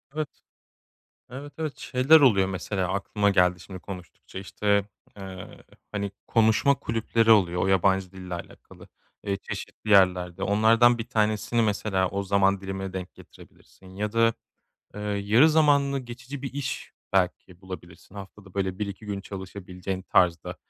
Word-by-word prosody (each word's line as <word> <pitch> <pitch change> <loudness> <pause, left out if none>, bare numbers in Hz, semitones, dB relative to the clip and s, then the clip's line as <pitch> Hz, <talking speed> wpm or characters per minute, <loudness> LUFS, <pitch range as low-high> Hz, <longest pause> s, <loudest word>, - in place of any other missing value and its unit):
Evet. 155 -2 -5 0.9
Evet, 140 +3 -8
evet. 155 -4 -3
Şeyler 135 +6 +4
oluyor, 100 -8 +4
mesela 95 0 -3
aklıma 100 +1 0
geldi 90 -2 +3
şimdi 95 +1 -9
konuştukça, 90 -1 -10
işte, 100 +1 0 0.3
eee, 95 -2 -9 0.3
hani, 100 -1 -2 0.2
konuşma 115 +5 +3
kulüpleri 115 -2 0
oluyor 90 -5 +4
o - - +1
yabancı 95 0 +2
dille 90 -2 -7
alakalı, 85 - -11 0.4
eee, 100 -1 -1
çeşitli 105 +2 -7
yerlerde. 90 -3 +3
Onlardan 115 +4 +4
1 115 +1 -5
tanesini 110 0 +1
mesela 100 -3 0
o 100 +1 -3
zaman 100 0 +2
dilimine 95 0 -5
denk 95 -1 -6
getirebilirsin 95 0 -17
ya 105 +1 -2
da, 115 0 +3 0.6
ııı, 105 0 -3
yarı 110 +10 +4
zamanlı 140 -3 +3
geçici 125 +2 -9
bir 135 -2 -6
iş 140 -1 -4 0.2
belki 90 -1 -1
bulabilirsin 90 0 -11
haftada, 100 -1 -11
böyle, 95 -2 -2
1-2 100 0 -5
gün 100 -1 -4
çalışabileceğin 95 -1 -6
tarzda. 85 -4 +1
100 Hz, 140 wpm, -26 LUFS, 95-115 Hz, 0.9 s, Şeyler